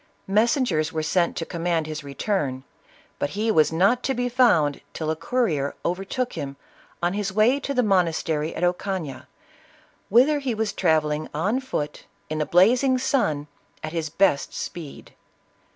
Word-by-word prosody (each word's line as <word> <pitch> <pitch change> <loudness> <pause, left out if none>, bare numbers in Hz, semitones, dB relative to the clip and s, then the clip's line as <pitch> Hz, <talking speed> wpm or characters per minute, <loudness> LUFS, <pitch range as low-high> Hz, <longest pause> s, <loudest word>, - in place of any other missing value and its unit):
Messengers 205 - +2
were 155 -1 -2
sent 170 +2 +1
to 165 - -2
command 170 -2 -1
his 155 -1 -6
return, 140 -2 -2 0.6
but 145 - 0
he 220 +1 +1
was 155 -7 +4
not 195 +10 +3
to 265 - -1
be 245 +1 -1
found 175 - +3
till 155 -1 -2
a - - -1
courier 160 - -1
overtook 195 +8 -2
him 140 -1 -5 0.5
on 175 +1 +2
his 205 -1 -2
way 220 +7 +3
to 280 - -4
the 250 -2 +2
monastery 165 -5 +1
at 170 - -3
Ocana, 175 -5 -2 0.8
whither 260 +8 +5
he 260 -5 -2
was 220 -1 -1
travelling 155 -3 +1
on 210 - +1
foot 150 - -4 0.3
in 155 - -1
the 150 - -1
blazing 245 +9 +4
sun, 245 - 0 0.4
at 155 +1 -5
his 160 -2 -2
best 175 -3 +1
speed. 160 -5 -7
175 Hz, 155 wpm, -24 LUFS, 155-235 Hz, 0.8 s, whither